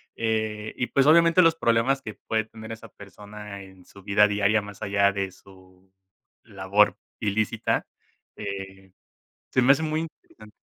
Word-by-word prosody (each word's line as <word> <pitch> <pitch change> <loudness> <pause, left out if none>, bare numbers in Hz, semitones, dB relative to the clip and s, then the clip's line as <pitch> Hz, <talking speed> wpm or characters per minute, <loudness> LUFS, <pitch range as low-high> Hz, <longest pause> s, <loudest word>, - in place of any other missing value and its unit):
Eh, 110 -1 -2
y 125 - -1
pues, 135 0 +2
obviamente, 170 +3 +6
los 165 -1 +4
problemas 120 0 +1
que 110 - -8
puede 110 -1 -2
tener 110 0 -11
esa 115 0 -9
persona 105 +1 -11
en 95 -1 -17
su 100 - -16
vida 105 +1 +4
diaria, 105 +1 +2
más 100 -1 -11
allá 100 0 +2
de 95 -1 -3
su 95 0 -20 0.5
labor 100 +2 +1 0.2
ilícita, 105 0 -1 0.5
eh, 95 -1 -8 0.6
se 130 - +2
me 135 +3 +7
hace 145 - 0
muy 155 0 -1
interesante. 110 -9 -13
105 Hz, 150 wpm, -25 LUFS, 100-115 Hz, 0.6 s, me